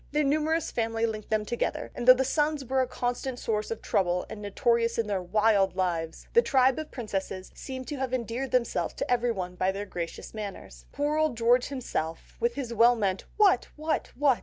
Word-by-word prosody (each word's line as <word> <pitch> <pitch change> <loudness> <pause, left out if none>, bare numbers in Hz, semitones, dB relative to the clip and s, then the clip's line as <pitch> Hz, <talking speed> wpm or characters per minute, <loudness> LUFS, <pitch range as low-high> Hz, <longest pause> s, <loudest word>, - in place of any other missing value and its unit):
Their 300 0 +3
numerous 310 +3 +1
family 225 -1 0
linked 215 -2 -4
them 215 -1 +1
together, 240 +3 -2
and 245 - -5
though 255 - +11
the 265 +1 0
sons 295 0 0
were 265 +2 +1
a 255 - 0
constant 245 +1 -3
source 215 -3 -2
of 225 - -5
trouble 180 -1 +1
and 215 -1 -7
notorious 230 +3 +1
in 230 - +1
their 200 -3 -1
wild 200 0 +2
lives, 170 -4 -2
the 470 - +7
tribe 265 - +3
of 310 - -5
princesses 195 -5 -4
seem 260 -1 -7
to 290 - -5
have 265 -1 -2
endeared 250 +1 -2
themselves 235 -9 0
to - - -3
everyone 230 -7 0
by 185 +1 +1
their 200 +1 -5
gracious 170 -4 -6
manners. 195 - -7
Poor 295 +2 0
old 310 -6 +1
George 240 +2 +4
himself, 165 - -4
with 475 +1 +1
his 250 -4 -4
well 235 +2 +6
meant, 195 -4 -1
"What? 410 -3 +4
What? 310 +1 -2
What?" 270 -2 +3
235 Hz, 200 wpm, -28 LUFS, 200-265 Hz, -, though